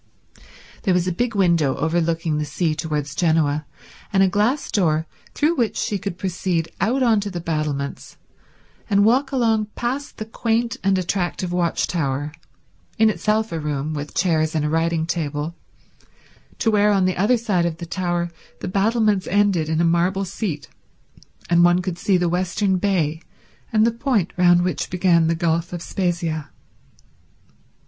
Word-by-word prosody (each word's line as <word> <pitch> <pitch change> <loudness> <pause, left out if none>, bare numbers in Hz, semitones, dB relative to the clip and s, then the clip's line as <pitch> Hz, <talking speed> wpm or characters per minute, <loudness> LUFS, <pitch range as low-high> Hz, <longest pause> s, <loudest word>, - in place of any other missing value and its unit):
There 190 -5 +2
was 180 -1 +1
a - - +1
big 235 +6 -1
window 170 -8 +3
overlooking 165 -1 0
the - - 0
sea 155 +3 -1
towards 150 -3 -3
Genoa, 155 -3 +1 0.4
and 195 -1 +4
a - - +5
glass 210 +9 0
door 160 -5 +1 0.3
through 310 +3 +2
which 235 -6 0
she 205 - -1
could 190 -2 -5
proceed 180 -3 -2
out 250 +7 +2
on 225 -4 +4
to 205 0 -3
the 180 -3 -5
battlements 150 -4 -3 0.7
and 200 0 +4
walk 265 +5 +3
along 225 -5 +1
past 265 +4 -3
the 215 - -5
quaint 230 +1 -1
and 195 0 +3
attractive 180 -1 -2
watch 175 -2 +1
tower, 145 -3 -2 0.7
in 220 -1 +5
itself 215 +4 0
a 165 - -2
room 150 0 -3
with 145 0 -6
chairs 160 -3 +1
and 150 -1 +1
a - - 0
writing 165 0 +1
table, 155 -2 -3 1.0
to 225 - +1
where 210 0 +4
on 195 -2 +3
the 185 - +1
other 210 +7 +3
side 195 -7 0
of 165 -2 -4
the 170 - -6
tower 175 -1 -2 0.3
the - - -5
battlements 205 +1 +1
ended 195 -5 +2
in 160 0 0
a - - +3
marble 180 +4 +1
seat, 180 -5 -4 0.8
and 170 0 +4
one 175 +1 +5
could 180 -1 -4
see 190 0 +2
the 175 0 +1
western 185 +2 0
bay 170 -5 0 0.5
and 220 0 +4
the 235 - +3
point 230 - 0
round 175 -1 +4
which 180 - -2
began 175 -3 +3
the 165 - +1
Gulf 165 0 0
of 170 -1 -5
Spezia. 170 -5 -2
175 Hz, 165 wpm, -22 LUFS, 160-205 Hz, 1.0 s, a